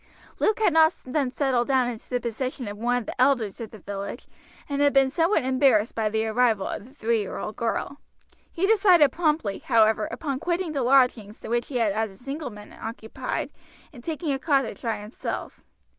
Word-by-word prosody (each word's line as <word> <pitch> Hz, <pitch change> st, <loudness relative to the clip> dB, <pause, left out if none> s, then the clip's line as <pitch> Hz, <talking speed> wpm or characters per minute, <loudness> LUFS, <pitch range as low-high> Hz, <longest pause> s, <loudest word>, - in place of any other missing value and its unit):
Luke 430 Hz, -, +2 dB
had 425 Hz, -7 st, +2 dB
not 320 Hz, 0 st, +5 dB
then 265 Hz, 0 st, 0 dB
settled 255 Hz, -2 st, 0 dB
down 260 Hz, -2 st, +3 dB
into 235 Hz, -3 st, -7 dB
the 250 Hz, -, 0 dB
position 245 Hz, +1 st, -4 dB
of 205 Hz, -, -5 dB
one 240 Hz, +3 st, 0 dB
of 245 Hz, -, -4 dB
the -, -, -4 dB
elders 245 Hz, -6 st, +2 dB
of 225 Hz, -, -6 dB
the 220 Hz, -, -12 dB
village, 200 Hz, +4 st, -6 dB, 0.4 s
and 280 Hz, -1 st, -2 dB
he -, -, +4 dB
had 285 Hz, -, +4 dB
been 270 Hz, -1 st, +4 dB
somewhat 330 Hz, +2 st, +2 dB
embarrassed 260 Hz, -4 st, +3 dB
by 220 Hz, -1 st, 0 dB
the 220 Hz, +1 st, 0 dB
arrival 220 Hz, -3 st, +2 dB
of -, -, -5 dB
the 255 Hz, -, -16 dB
three 235 Hz, -4 st, 0 dB
year 200 Hz, -, -5 dB
old 215 Hz, -, -5 dB
girl. 235 Hz, +5 st, -2 dB, 0.5 s
He 350 Hz, -, 0 dB
decided 375 Hz, -, +5 dB
promptly, 300 Hz, -, 0 dB
however, 220 Hz, -3 st, +3 dB
upon 280 Hz, -5 st, -3 dB
quitting 345 Hz, 0 st, -1 dB
the 285 Hz, -3 st, -1 dB
lodgings 245 Hz, -5 st, +2 dB
which 240 Hz, +1 st, -1 dB
he 275 Hz, -, -8 dB
had 225 Hz, -4 st, +2 dB
as 220 Hz, +2 st, -1 dB
a 195 Hz, -, -16 dB
single 275 Hz, +4 st, -5 dB
man 210 Hz, -2 st, -12 dB
occupied 225 Hz, -, -5 dB, 0.4 s
and 240 Hz, -4 st, -12 dB
taking 320 Hz, 0 st, -2 dB
a 270 Hz, -, -2 dB
cottage 270 Hz, -, 0 dB
by 230 Hz, -2 st, -1 dB
himself. 210 Hz, +3 st, -6 dB
250 Hz, 205 wpm, -25 LUFS, 220-285 Hz, 0.5 s, not